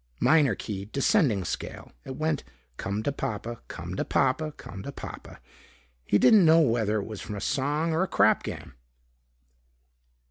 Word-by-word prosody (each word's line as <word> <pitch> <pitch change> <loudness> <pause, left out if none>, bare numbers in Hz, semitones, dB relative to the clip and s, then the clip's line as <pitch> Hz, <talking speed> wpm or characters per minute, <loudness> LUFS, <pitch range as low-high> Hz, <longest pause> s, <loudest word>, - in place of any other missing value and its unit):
Minor 150 -8 +4
key, 100 -1 -5
descending 130 - +2
scale. - - -6
It 130 - -6
went 155 -1 -1 0.3
"Come 100 +2 -3
to 145 - 0
Papa, 115 -3 -5
come - - -7
to - - 0
Papa, 155 +4 +1
come 95 -7 -10
to 140 - -6
Papa." - - -9 0.7
He 105 - +4
didn't 210 - +6
know 165 0 +6
whether 115 -6 +1
it 100 - -4
was 110 -3 -7
from 105 - -6
a - - -4
song 145 +8 0
or 160 - +1
a 190 - +1
crap - - +3
game. - - -7
130 Hz, 165 wpm, -27 LUFS, 105-155 Hz, 0.7 s, didn't